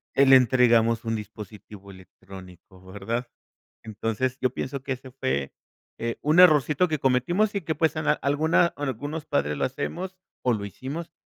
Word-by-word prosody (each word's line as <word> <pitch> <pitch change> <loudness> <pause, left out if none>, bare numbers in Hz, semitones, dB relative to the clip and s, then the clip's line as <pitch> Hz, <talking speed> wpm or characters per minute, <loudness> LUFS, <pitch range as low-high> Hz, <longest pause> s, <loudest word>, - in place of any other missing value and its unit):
le 135 -1 +7
entregamos 115 -3 +3
un 115 0 -1
dispositivo 105 -1 -10
electrónico, 95 0 -14
¿verdad? 110 +6 -4 0.6
Entonces, 115 +4 -3
yo 130 -2 +1
pienso 135 0 -5
que 135 - -5
ese 130 0 -11
fue, 70 - -2 0.5
eh, 115 0 -3
un 155 +4 +3
errorcito 155 0 +5
que 155 -3 -2
cometimos, 175 - +1
y 200 - -1
que 160 0 -2
pues, 160 +1 +1
a 155 - +1
alguna 155 +4 +2
algunos 145 +3 -4
padres 75 +1 -1
lo - - 0
hacemos, 180 +8 -5 0.3
o 125 - +2
lo 100 -2 -3
hicimos, 140 - -7
125 Hz, 155 wpm, -25 LUFS, 105-150 Hz, 0.6 s, le